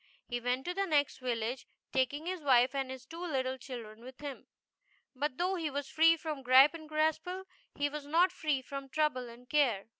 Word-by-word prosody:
He 240 -1 -3
went 250 +2 -1
to 355 - -2
the 390 +1 -1
next 290 -5 +2
village, 245 0 -2 0.2
taking 270 +4 0
his 365 -1 -3
wife 255 -2 +4
and 270 -1 -2
his 260 -1 -8
two 330 +5 -8
little 260 -5 -1
children 230 -4 -8
with 255 +1 -11
him. 285 -3 -7 0.7
But 275 0 -2
though 360 +2 +1
he 330 -5 -1
was 285 0 -4
free 330 +1 +5
from 310 -3 -5
Gripe 260 +4 +7
and 315 -2 -10
Graspall 315 +4 0 0.3
she 290 - +2
was 290 0 -6
not 345 +5 +4
free 300 -7 -1
from 275 0 -7
trouble 260 -4 0
and 240 +1 -14
care. 250 -10 +2
280 Hz, 200 wpm, -32 LUFS, 255-315 Hz, 0.7 s, Gripe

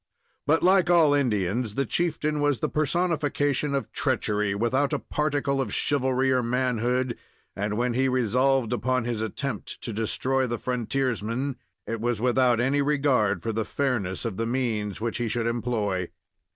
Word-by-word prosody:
But, 160 +2 +3
like 185 -1 +4
all 165 -4 +5
Indians, 110 -4 0
the 140 - 0
chieftain 155 0 0
was 145 -2 +2
the - - -1
personification 150 -3 0
of 135 - -3
treachery, 105 -1 0
without 130 +6 +1
a - - +2
particle 145 -2 -1
of 130 - -3
chivalry 130 -1 +1
or 130 -1 +3
manhood, 125 0 0 0.4
and 105 +1 -2
when 120 0 0
he 130 +2 +2
resolved 130 0 +2
upon 130 0 0
his 120 -2 -2
attempt 115 0 -4
to 115 - -4
destroy 130 +4 0
the 120 0 -2
frontiersman, 125 +1 -2 0.3
it 115 -1 -4
was 120 -2 0
without 125 0 +3
any 135 +4 +2
regard 140 -7 +1
for 115 - -1
the 110 +1 0
fairness 110 -8 -2
of 110 -5 -3
the 115 0 -1
means 115 -5 -1
which 115 +1 -2
he 120 - 0
should 115 +1 -1
employ. 110 -6 -1
125 Hz, 160 wpm, -26 LUFS, 115-140 Hz, 0.4 s, all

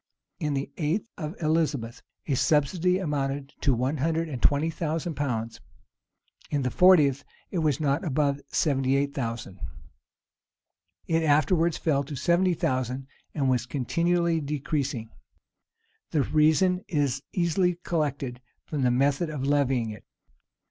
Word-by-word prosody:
In 150 -4 -1
the 135 +1 -3
eighth 165 +7 -1
of 155 0 -6
Elizabeth, 150 -7 0 0.2
a 145 - -1
subsidy 165 +7 +2
amounted 140 -5 -2
to 135 -4 +3
one 130 +6 -1
hundred 160 +3 0
and 130 -5 -5
twenty 145 +3 +3
thousand 165 +1 -2
pounds: 115 -6 -3 0.9
in 145 -2 0
the 125 - -1
fortieth, 150 -7 +5 0.3
it 180 - -1
was 155 -2 +1
not 145 0 +1
above 145 -3 0
seventy 135 -3 +1
eight 140 0 0
thousand.[] 115 -7 -4 1.5
It 165 0 +1
afterwards 160 +2 +3
fell 140 -4 +1
to 145 - -6
seventy 175 +5 +2
thousand, 130 -1 -1 0.3
and 140 -4 +1
was 125 -2 +1
continually 170 +5 +1
decreasing.[] 140 -5 -3 1.0
The 150 -3 +1
reason 160 +5 +3
is 140 -5 0
easily 180 0 +1
collected 140 -6 -2 0.2
from 150 -3 -3
the 125 - +3
method 140 +6 +1
of 145 -3 -4
levying 135 -5 +1
it. 105 - -10
145 Hz, 135 wpm, -27 LUFS, 135-165 Hz, 1.5 s, fortieth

